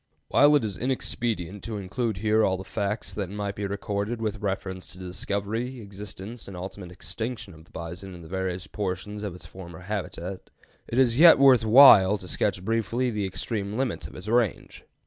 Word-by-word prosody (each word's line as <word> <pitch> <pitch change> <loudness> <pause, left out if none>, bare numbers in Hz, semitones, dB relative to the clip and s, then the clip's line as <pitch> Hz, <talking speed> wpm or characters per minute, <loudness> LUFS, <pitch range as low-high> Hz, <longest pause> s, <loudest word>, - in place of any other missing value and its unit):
While 145 +2 +6
it 145 - +2
is 100 -4 -4
inexpedient 115 -7 -2
to 110 -2 -4
include 105 +2 -2
here 110 +2 +2
all 95 -2 +2
the 95 - -7
facts 100 +2 -3
that 100 -4 -3
might 100 0 -3
be 100 0 -3
recorded 100 +3 -3
with 105 -3 -3
reference 95 -2 -3
to - - -10
the 95 - -8
discovery, 105 +7 -3
existence, 105 +2 -9
and 95 -2 -8
ultimate 90 0 -7
extinction 105 +5 -5
of 80 0 -15
the - - -24
bison 90 +3 -7
in 85 - -11
the - - -11
various 95 0 -3
portions 100 +1 -4
of 100 -4 -4
its 90 - -13
former 85 -2 -10
habitat, 95 -2 -5 0.4
it 115 - -3
is 125 -1 +3
yet 170 0 +9
worth 130 -4 +6
while 110 -5 +8
to 95 - -10
sketch 95 +1 -1
briefly 115 +3 0
the 105 -2 -2
extreme 100 +2 -3
limits 130 -4 -2
of - - -14
its 90 +3 -9
range. 115 -5 0
100 Hz, 190 wpm, -26 LUFS, 95-115 Hz, 0.4 s, yet